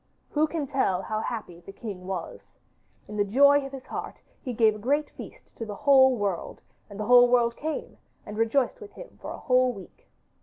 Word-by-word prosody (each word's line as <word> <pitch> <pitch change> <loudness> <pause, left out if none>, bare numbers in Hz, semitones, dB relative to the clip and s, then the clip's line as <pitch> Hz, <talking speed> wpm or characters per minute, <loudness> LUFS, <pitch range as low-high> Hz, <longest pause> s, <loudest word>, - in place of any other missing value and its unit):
Who 305 +1 +2
can 310 -2 -3
tell 260 -9 0
how 215 0 -3
happy 215 -7 -5
the 175 - -12
king 195 -3 -8
was? 185 -3 -7 0.5
In 210 - -7
the 205 - +3
joy 280 +7 +5
of - - -13
his 270 -2 -9
heart - - -6 0.2
he 255 - -5
gave 220 -2 +3
a - - -9
great 285 +7 0
feast - - -12
to - - -5
the 210 -2 -6
whole 265 +1 +5
world, 200 -5 -3 0.3
and 205 0 -10
the 215 - -2
whole 245 +1 +7
world 235 -1 +3
came 315 +1 -5 0.3
and 210 - -8
rejoiced 255 - 0
with 420 - -11
him - - -13
for - - -7
a - - -6
whole 255 0 +2
week. 195 -5 -14
240 Hz, 205 wpm, -26 LUFS, 205-275 Hz, 0.5 s, whole